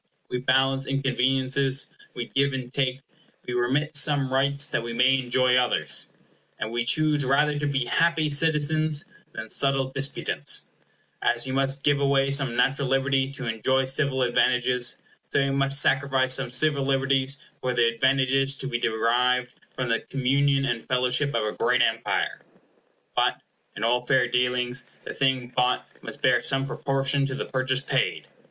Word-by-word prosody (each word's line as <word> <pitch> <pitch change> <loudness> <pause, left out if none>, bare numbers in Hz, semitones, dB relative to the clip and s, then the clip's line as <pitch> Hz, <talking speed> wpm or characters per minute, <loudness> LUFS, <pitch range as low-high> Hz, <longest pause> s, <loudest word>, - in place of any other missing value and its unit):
We 125 - -1
balance 135 +1 +1
inconveniences; 135 0 +1 0.3
we 120 - -4
give 140 +2 0
and 130 -1 -6
take; 135 -1 -1 0.4
we 125 - -5
remit 135 +6 0
some 140 -3 +2
rights, 140 +1 +1
that 145 - -2
we 115 0 -6
may 130 +3 +3
enjoy 125 0 +1
others; 100 - +2 0.4
and 110 - -4
we 120 0 -1
choose 150 +3 +2
rather 145 +3 +1
to 145 - -1
be 135 -3 -1
happy 165 +2 +1
citizens 155 0 +1 0.3
than 110 0 -7
subtle 135 +2 +1
disputants. 135 +1 -2 0.5
As 120 +1 0
we 130 - -4
must 135 +1 0
give 145 -1 +2
away 140 -1 +2
some 140 -4 0
natural 135 +2 +1
liberty 135 0 +1
to 130 -2 -7
enjoy 130 +4 0
civil 130 0 +1
advantages, 125 0 +1 0.3
so - - +1
we 140 0 +1
must 135 0 +2
sacrifice 135 -2 +2
some 125 - -1
civil 140 +3 +1
liberties 135 0 +1 0.2
for 125 -1 -2
the 120 -1 +3
advantages 135 +3 +1
to 135 - -4
be 120 -3 -2
derived 120 +3 +1 0.2
from 130 -1 -3
the 115 - +1
communion 135 +1 0
and 120 -3 -3
fellowship 125 +2 +1
of 115 - 0
a 105 - -1
great - - +1
empire. - - -1 0.7
But, - - +1 0.4
in 105 - -4
all 125 +2 +1
fair 125 0 +2
dealings, 125 +1 0 0.2
the - - -6
thing 130 -2 0
bought 125 0 +1
must - - -10
bear - - +3
some 135 0 0
proportion 135 0 -1
to 130 - -4
the 140 - -4
purchase 130 0 -1
paid. 135 - -1
135 Hz, 160 wpm, -25 LUFS, 125-140 Hz, 0.7 s, may